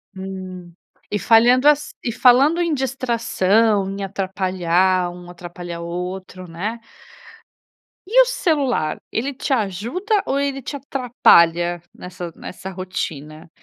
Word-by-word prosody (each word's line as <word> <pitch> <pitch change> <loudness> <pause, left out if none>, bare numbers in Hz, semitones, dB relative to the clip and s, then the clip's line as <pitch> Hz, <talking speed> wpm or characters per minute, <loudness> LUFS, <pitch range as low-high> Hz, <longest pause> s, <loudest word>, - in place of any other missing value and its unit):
Hum 185 -2 -8 0.4
e 210 - -1
falhando 245 +6 +5
as 295 0 +1
e 235 - -1
falando 270 +8 +4
em 335 -3 +1
distração 230 -6 +1
em 195 0 -5
atrapalhar 185 -2 0
um, 175 0 -11
atrapalhar 175 -1 -8
o 170 - -6
outro, 180 +1 -6
né? 205 +8 -4 1.3
E 475 +6 +5
o - - +5
celular, 285 - 0
ele 270 +5 -2
te 270 +2 -2
ajuda 245 - -1
ou 275 - 0
ele 275 -1 -2
te 285 - -6
atrapalha 175 - +3
nessa 180 -1 -8
nessa 185 +1 -8
rotina, 165 -4 -6
195 Hz, 125 wpm, -20 LUFS, 180-260 Hz, 1.3 s, falhando